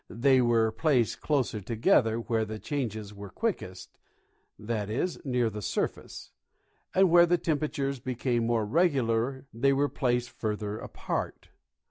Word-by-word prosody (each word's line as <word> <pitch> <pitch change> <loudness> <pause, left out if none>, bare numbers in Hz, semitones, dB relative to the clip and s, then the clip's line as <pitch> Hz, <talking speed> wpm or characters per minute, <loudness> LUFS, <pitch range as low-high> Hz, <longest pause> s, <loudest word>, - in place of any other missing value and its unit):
They 130 +2 +3
were 115 -2 +3
placed 125 -1 +1
closer 130 -7 0
together 110 +1 +2
where 115 -1 0
the 110 0 -5
changes 110 -6 -4
were 100 -1 -9
quickest 165 - -4 0.3
— 105 - -19
i. 110 -3 -1
e., 115 +11 0 0.2
near 125 -3 +1
the 105 -1 -5
surface 95 - -4 0.3
— - - -31
and 190 0 +6
Avhere 170 0 +6
the 175 - +4
temperatures 145 -4 -2
became 120 -1 -1
more 115 -2 +1
regular 130 -3 +1
they 135 +5 +2
were 140 +1 +1
placed 125 -3 -1
further 105 -1 -3
apart. - - -5
120 Hz, 145 wpm, -28 LUFS, 110-140 Hz, 0.3 s, and